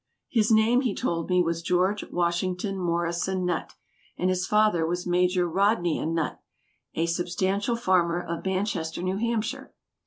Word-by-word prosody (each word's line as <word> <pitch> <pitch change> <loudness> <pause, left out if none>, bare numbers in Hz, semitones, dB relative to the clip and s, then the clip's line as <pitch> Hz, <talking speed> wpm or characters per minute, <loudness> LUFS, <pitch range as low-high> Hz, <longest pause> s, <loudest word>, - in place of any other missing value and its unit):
His 220 -3 +2
name, 225 +3 +4
he 240 -7 -1
told 165 0 -2
me, 180 -1 +4
was 165 0 -2
George 180 +4 +1
Washington 180 +3 -1
Morrison 175 +1 -1
Nutt, 175 -2 -2 0.4
and 185 +1 +1
his 185 0 -1
father 210 -5 +3
was 175 +2 -2
Major 180 0 +2
Rodnia 175 -3 +1
Nutt, 165 -1 -2 0.5
a 165 - +1
substantial 185 +6 -1
farmer, 180 -6 +2
of 170 -1 -5
Manchester, 185 -4 -2
New 185 +1 -1
Hampshire. 230 +2 -2
180 Hz, 145 wpm, -26 LUFS, 170-200 Hz, 0.5 s, name